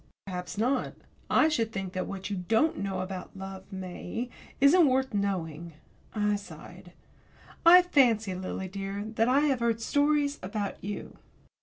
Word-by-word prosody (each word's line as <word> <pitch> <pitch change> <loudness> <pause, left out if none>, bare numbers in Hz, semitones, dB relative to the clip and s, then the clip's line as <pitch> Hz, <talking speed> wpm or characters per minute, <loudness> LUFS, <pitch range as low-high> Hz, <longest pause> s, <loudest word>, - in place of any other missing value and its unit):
"Perhaps 180 0 -6
not. 250 +4 0 0.3
I 310 - +5
should 230 -8 0
think 195 -3 -5
that 185 - -2
what 195 +1 -6
you - - -1
don't 220 - +1
know 195 -1 -2
about 185 0 -7
love, 190 0 -8
May, 190 +5 -5 0.3
isn't 300 +4 +6
worth 265 -1 +1
knowing." 170 -5 -2 0.4
I 210 -1 +1
sighed. 175 -1 -12 0.7
"I 360 +1 +10
fancy, 235 - +3
Lily 185 +1 -4
dear, 195 +1 -5
that 225 +1 +2
I 270 +3 +4
have 280 -4 +2
heard 230 -1 +1
stories 285 +3 +1
about 200 +1 -4
you." 205 +1 -6
205 Hz, 150 wpm, -28 LUFS, 190-260 Hz, 0.7 s, I